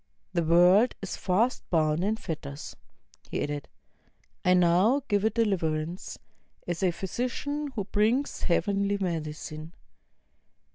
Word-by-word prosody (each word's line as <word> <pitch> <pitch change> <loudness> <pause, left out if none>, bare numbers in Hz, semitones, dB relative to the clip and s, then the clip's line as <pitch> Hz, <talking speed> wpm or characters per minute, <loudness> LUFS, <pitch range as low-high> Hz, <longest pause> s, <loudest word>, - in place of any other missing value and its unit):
The 170 - +2
world 180 +8 +5
is 195 - -4
fast 220 +7 +1
bound 155 0 +2
in 210 +3 +1
fetters," 150 -7 -6 0.5
he - - -2
added; 145 -1 -4 0.8
"I 180 0 +5
now 180 +10 +4
give 205 -2 +1
it 220 0 +1
deliverance, 170 -6 -1 0.5
as 175 -1 -3
a 185 - +3
physician 250 - -3
who 205 - -1
brings 220 +8 +1
heavenly 200 +3 +1
medicine. 155 -2 -4
185 Hz, 115 wpm, -28 LUFS, 165-215 Hz, 0.8 s, world